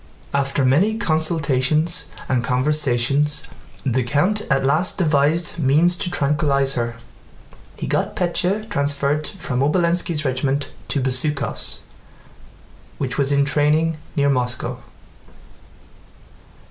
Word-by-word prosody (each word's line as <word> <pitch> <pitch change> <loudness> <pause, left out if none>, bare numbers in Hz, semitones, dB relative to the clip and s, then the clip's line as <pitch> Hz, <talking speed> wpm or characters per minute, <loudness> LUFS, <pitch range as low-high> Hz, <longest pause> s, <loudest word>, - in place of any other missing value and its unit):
After 140 -1 0
many 185 +13 +3
consultations 155 - +1 0.2
and 125 -2 0
conversations, 140 +2 +1 0.4
the 130 -1 +1
count 150 - +1
at 135 -1 +2
last 155 +6 +1
devised 155 0 +2
means 155 +5 +3
to 180 - -2
tranquillize 140 -3 +1
her. 120 -2 -2 0.8
He - - -4
got - - -1
Pétya 185 +4 0
transferred 145 -4 -1
from 125 -2 -4
Obolénski's 170 +1 +1
regiment 135 +2 -1 0.2
to 140 - -1
Bezúkhov's, 140 +3 -1 1.2
which 130 0 -3
was 140 0 +1
in 140 0 +3
training 150 +2 +1 0.2
near 140 -1 +2
Moscow. 125 -2 -2
145 Hz, 105 wpm, -21 LUFS, 135-160 Hz, 1.2 s, many